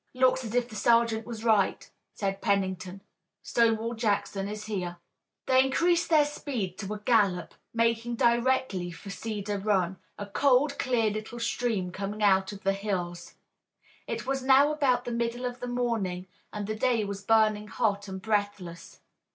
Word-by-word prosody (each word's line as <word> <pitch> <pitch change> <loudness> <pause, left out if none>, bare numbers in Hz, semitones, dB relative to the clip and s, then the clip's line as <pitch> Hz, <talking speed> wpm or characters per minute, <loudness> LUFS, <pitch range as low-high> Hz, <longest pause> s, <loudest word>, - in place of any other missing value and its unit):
"Looks 255 0 +3
as 225 0 -5
if 245 -1 +2
the 225 - -11
sergeant 230 0 +2
was 225 -2 -6
right," 215 -4 +2 0.3
said 195 -2 -2
Pennington. 190 -1 -1 0.4
"Stonewall 230 0 +1
Jackson 205 -3 -1
is 210 0 -6
here." 180 -5 -4 0.5
They 260 0 +5
increased 335 +6 +2
their 310 -3 +5
speed 240 -11 -4
to 200 -1 -5
a - - -8
gallop, 205 -6 +2 0.2
making 230 +1 0
directly 235 -6 +1
for 175 +4 -9
Cedar 205 -1 -4
Run, 190 -3 +1 0.2
a 205 - -5
cold, 275 +6 +2
clear 230 -4 +1
little 215 +3 -6
stream 230 -5 -1
coming 200 +3 -4
out 190 -1 +3
of 200 -1 -10
the 195 0 +2
hills. 180 -4 -4 0.7
It 230 -1 -4
was 270 0 -1
now 270 +3 +5
about 265 -5 +1
the 245 - -3
middle 235 +1 -2
of 245 0 -4
the 245 - -5
morning 225 -7 -1 0.3
and 210 -1 -4
the 215 - -2
day 230 -1 +1
was 200 0 -6
burning 215 -1 +3
hot 205 -1 -1
and 190 -1 -6
breathless. 205 -5 -3
215 Hz, 160 wpm, -28 LUFS, 195-240 Hz, 0.7 s, They